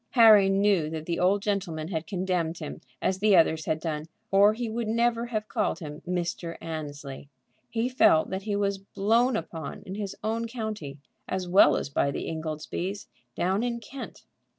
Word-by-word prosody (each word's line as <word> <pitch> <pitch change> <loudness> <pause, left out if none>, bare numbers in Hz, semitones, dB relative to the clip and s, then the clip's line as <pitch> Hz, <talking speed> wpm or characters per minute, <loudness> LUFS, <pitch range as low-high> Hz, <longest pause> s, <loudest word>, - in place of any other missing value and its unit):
Harry 215 -5 +8
knew 195 -5 +2
that 160 -1 -5
the 170 0 -2
old 195 +3 +2
man 180 -6 -2
had 160 -3 -3
condemned 180 -4 -1
him 155 -3 -7 0.2
as 190 0 +1
the 210 -1 +5
others 160 -2 +3
had 155 - 0
done, 155 -1 -3 0.2
or 200 +2 +6
he 240 0 -3
would 225 0 -3
never 235 +1 +1
have 215 -2 -3
called 215 -2 0
him 150 -1 -8
Mr. 175 -1 -3
Annesley. 145 -4 -7 0.4
He 235 +1 0
felt 250 -10 +4
that 190 0 -2
he 205 0 -2
was 200 -1 0
"blown 225 +6 +1
upon" 165 -8 -5
in 190 -2 -7
his 200 -1 -4
own 225 +2 -1
county, 215 - -5 0.3
as 185 -1 -2
well 175 -6 +6
as - - -3
by 140 - +1
the 140 - -4
Ingoldsbys 160 +5 -4 0.3
down 190 +4 +1
in 240 -1 -1
Kent. 260 +4 -9
190 Hz, 175 wpm, -27 LUFS, 160-215 Hz, 0.4 s, Harry